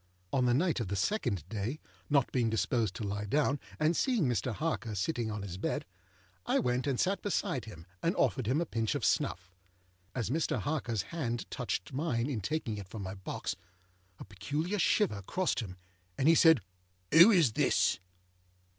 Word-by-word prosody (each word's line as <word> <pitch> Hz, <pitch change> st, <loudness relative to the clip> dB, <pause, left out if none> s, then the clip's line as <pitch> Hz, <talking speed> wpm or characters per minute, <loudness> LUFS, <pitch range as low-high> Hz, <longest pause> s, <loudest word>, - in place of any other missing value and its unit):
On 130 Hz, -2 st, +3 dB
the 120 Hz, -, +3 dB
night 165 Hz, +1 st, +1 dB
of 115 Hz, -, -2 dB
the 100 Hz, -, -2 dB
second 100 Hz, -, -1 dB
day, 110 Hz, +8 st, -3 dB, 0.3 s
not 140 Hz, -3 st, +3 dB
being 120 Hz, -3 st, +1 dB
disposed 110 Hz, -1 st, 0 dB
to 105 Hz, -, -5 dB
lie 100 Hz, 0 st, -3 dB
down, 145 Hz, +5 st, +1 dB, 0.2 s
and 155 Hz, +3 st, +3 dB
seeing 245 Hz, -4 st, +2 dB
Mr. 125 Hz, 0 st, 0 dB
Harker 120 Hz, -5 st, -2 dB
sitting 115 Hz, -, -1 dB
on 105 Hz, -2 st, -4 dB
his 95 Hz, -2 st, -6 dB
bed, -, -, -2 dB, 0.6 s
I -, -, +1 dB
went 125 Hz, +2 st, 0 dB
and 135 Hz, -3 st, 0 dB
sat 195 Hz, +2 st, +1 dB
beside 135 Hz, -, -1 dB
him, 85 Hz, -7 st, -11 dB, 0.2 s
and 170 Hz, -, +1 dB
offered 130 Hz, -5 st, +1 dB
him 135 Hz, +6 st, +2 dB
a 170 Hz, -, 0 dB
pinch 115 Hz, -6 st, -1 dB
of -, -, -1 dB
snuff. 90 Hz, +1 st, 0 dB, 0.6 s
As 120 Hz, -2 st, -1 dB
Mr. 160 Hz, +3 st, 0 dB
Harkerâs 120 Hz, -9 st, -1 dB
hand 120 Hz, -8 st, -2 dB
touched 115 Hz, -1 st, -3 dB
mine 140 Hz, -3 st, -1 dB
in 115 Hz, -6 st, -2 dB
taking 115 Hz, -2 st, -2 dB
it 95 Hz, -2 st, -9 dB
from 105 Hz, -1 st, -6 dB
my 95 Hz, 0 st, -5 dB
box, 95 Hz, -2 st, -4 dB, 0.6 s
a -, -, -9 dB
peculiar 145 Hz, -, -3 dB
shiver 185 Hz, -, +2 dB
crossed 170 Hz, -, -1 dB
him, 95 Hz, -6 st, -6 dB, 0.4 s
and 135 Hz, -, +2 dB
he 165 Hz, -, +8 dB
said, 160 Hz, -, +6 dB, 0.5 s
âWho 175 Hz, +7 st, +9 dB
is 160 Hz, -10 st, +4 dB
this? -, -, +2 dB
125 Hz, 180 wpm, -31 LUFS, 105-155 Hz, 0.6 s, âWho